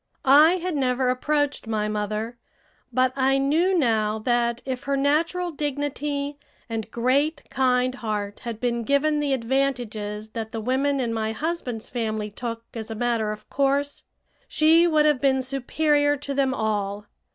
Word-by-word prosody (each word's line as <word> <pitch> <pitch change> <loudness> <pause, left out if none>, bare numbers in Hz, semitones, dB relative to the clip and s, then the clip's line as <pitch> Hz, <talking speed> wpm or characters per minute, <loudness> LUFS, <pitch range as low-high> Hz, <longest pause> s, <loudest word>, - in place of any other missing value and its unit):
I 295 +5 +7
had 365 -2 -2
never 255 -2 +1
approached 290 +1 0
my 215 -1 -1
mother, 215 +3 -3 0.5
but 255 +1 +2
I 270 0 +3
knew 325 +7 +2
now 220 -6 +1
that 235 +1 0
if 260 -1 -4
her 280 0 0
natural 330 +6 +1
dignity 290 -1 -3 0.3
and 225 -2 -4
great, 280 +7 +1
kind 255 -1 +2
heart 210 -4 -4
had 235 -3 -6
been 235 -1 0
given 290 +4 +2
the 290 -1 0
advantages 230 -5 -1
that 220 0 -5
the 225 - -2
women 270 +5 0
in 235 -3 -1
my 220 -1 -1
husband's 260 -5 -3
family 215 -3 -3
took 230 +1 -5
as 225 -1 -6
a 225 - -4
matter 230 -2 0
of 215 - -8
course, 280 +1 0 0.5
she 325 +2 +4
would 305 -2 +3
have 295 -4 +3
been 265 -2 +2
superior 290 +3 +1
to 280 0 -5
them 270 -1 +1
all. 210 -3 -2
260 Hz, 155 wpm, -24 LUFS, 225-285 Hz, 0.5 s, I